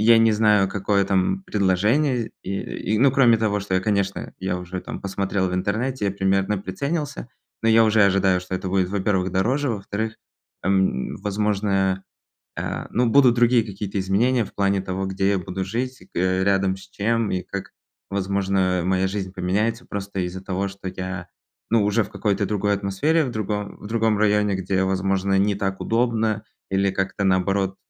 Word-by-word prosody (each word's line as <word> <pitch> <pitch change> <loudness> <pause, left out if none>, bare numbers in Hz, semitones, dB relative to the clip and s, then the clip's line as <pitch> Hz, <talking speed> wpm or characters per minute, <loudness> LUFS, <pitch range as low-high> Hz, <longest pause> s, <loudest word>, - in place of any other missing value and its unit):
я - - +6
не 115 0 +5
знаю, 105 -2 +4
какое 100 0 +1
там 100 - +1
предложение 110 - +1
и, 95 - -5 0.4
и, - - +1
ну 130 +3 +5
кроме 125 -4 +5
того, 105 -2 0
что 95 -1 -2
я, 95 - +3
конечно, 100 -1 -1
я 95 -1 -2
уже 90 +1 -6
там, - - -7
посмотрел 95 -1 -1
в - - -4
интернете, 110 +5 -1
я 100 - +1
примерно 95 +1 +1
приценился. 140 - -3 0.3
Но 115 - +2
я 115 0 +6
уже 110 -1 +4
ожидаю, 95 -2 +3
что 90 0 -4
это 95 - -4
будет, 95 -1 +1
во-первых, 95 -2 0
дороже. 130 +10 +1
Во-вторых, 110 +1 -3 0.5
эм, 95 -8 +1
возможно, 100 -2 0 0.5
а, - - -4
ну 125 +1 +2
будут 125 -1 +5
другие 120 0 +4
какие-то 100 -1 -4
изменения 115 +6 +2
в - - -13
плане 100 -1 +1
того, 95 0 -3
где 95 +1 0
я 100 - +1
буду 90 +2 -4
жить 125 +6 -3
к - - -6
э, 95 +1 +1
рядом 95 -1 +2
с 95 - -13
чем, 110 +2 0
и 90 - -1
как, 100 +1 -6 0.4
возможно, 95 -2 0
моя 95 0 +2
жизнь 95 -1 -4
поменяется, 105 +5 -1
просто 100 -1 -5
из-за 90 +1 -4
того, 95 +1 -2
что 95 -1 -7
я, 90 -1 -6 0.4
ну, 115 -1 +3
уже 105 +2 +2
в 100 - -10
какой-то 100 -1 0
другой 105 0 0
атмосфере, 100 +12 +1
в 125 - -4
другом 105 -1 -3
в 105 - -10
другом 110 -1 +1
районе, 105 -1 +2
где, 95 0 0
возможно, 95 +1 +1
не 100 0 +2
так 95 -1 -2
удобно 115 -2 0 0.3
или 95 0 +2
как-то 95 +1 -2
наоборот. 95 +1 +1
100 Hz, 180 wpm, -23 LUFS, 95-110 Hz, 0.5 s, я